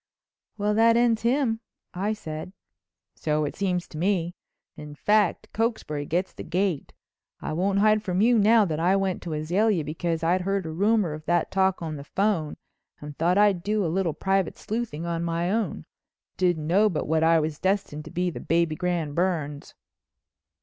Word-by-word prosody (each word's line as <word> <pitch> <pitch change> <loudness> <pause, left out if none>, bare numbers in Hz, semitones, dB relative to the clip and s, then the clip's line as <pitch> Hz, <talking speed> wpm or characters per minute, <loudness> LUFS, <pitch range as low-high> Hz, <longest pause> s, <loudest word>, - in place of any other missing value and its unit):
"Well 210 0 +1
that 230 +2 +5
ends 235 -2 +3
him," 235 -2 +1 0.3
I 200 +4 -1
said. 160 -3 -7 0.6
"So 150 -1 -1
it 145 - -5
seems 180 -3 -1
to 155 - -8
me. 175 -2 0 0.4
In 150 -1 -9
fact 210 +3 +1
Cokesbury 205 -11 -2
gets 180 +3 -1
the - - -9
gate. 180 -3 -1 0.5
I - - -4
won't 195 +4 0
hide 215 +1 +4
from 185 -3 -2
you 230 +2 +4
now 215 +1 +5
that 160 -4 -2
I 180 +4 +3
went 195 -2 -1
to 170 - -5
Azalea 175 +4 +1
because 165 +2 -3
I'd 180 +3 +2
heard 195 0 -1
a 160 - -4
rumor 200 0 +1
of 155 0 -9
that 175 -1 +1
talk 190 -2 +1
on 155 -2 -4
the 140 - -8
phone 180 -2 -1 0.4
and 150 0 -9
thought 175 +5 +1
I'd 205 -4 +4
do 210 +1 0
a 160 - -1
little 185 -4 0
private 195 -2 0
sleuthing 215 -8 -4
on 170 0 -2
my 170 +1 -1
own. 220 +1 -2 0.5
Didn't 175 -4 +1
know 200 +7 +4
but 170 - -3
what 160 +1 +2
I 165 0 +5
was 155 -1 -3
destined 190 -6 -1
to - - -8
be 180 +1 -1
the - - -7
Baby 165 -1 +1
Grand 170 -4 -2
Burns." 155 -5 -2
180 Hz, 185 wpm, -25 LUFS, 160-205 Hz, 0.6 s, that